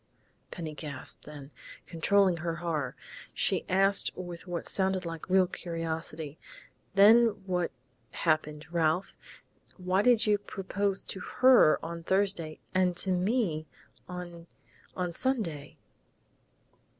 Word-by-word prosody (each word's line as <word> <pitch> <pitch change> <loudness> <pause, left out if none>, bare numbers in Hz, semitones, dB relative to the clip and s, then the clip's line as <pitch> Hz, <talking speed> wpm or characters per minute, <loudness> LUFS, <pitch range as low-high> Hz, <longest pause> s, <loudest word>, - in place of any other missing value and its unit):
Penny 160 -3 -6
gasped, 150 -3 -5
then, 145 -1 -10 0.3
controlling 185 +2 +2
her 165 0 -3
horror, 160 -6 -3 0.4
she - - 0
asked 195 +2 +4
with 175 -1 -8
what 175 -1 -4
sounded 190 -1 +2
like 165 +1 -7
real 185 0 +5
curiosity, 165 -3 -5 0.6
"Then 220 +4 +7 0.2
what 180 -2 -1 0.4
happened, 155 -2 -1
Ralph? 170 +2 0 0.6
Why 185 +1 +1
do 245 +2 +5
you 210 -1 +2
propose 195 0 -3
to 190 - -6
her 250 -5 +5
on 170 0 -6
Thursday 190 -3 0
and 185 -2 +2
to 190 - +2
me 180 -4 0 0.4
on 175 -1 -8 0.5
on 180 -2 -2
Sunday?" 170 - -2
180 Hz, 115 wpm, -29 LUFS, 160-195 Hz, 0.6 s, Then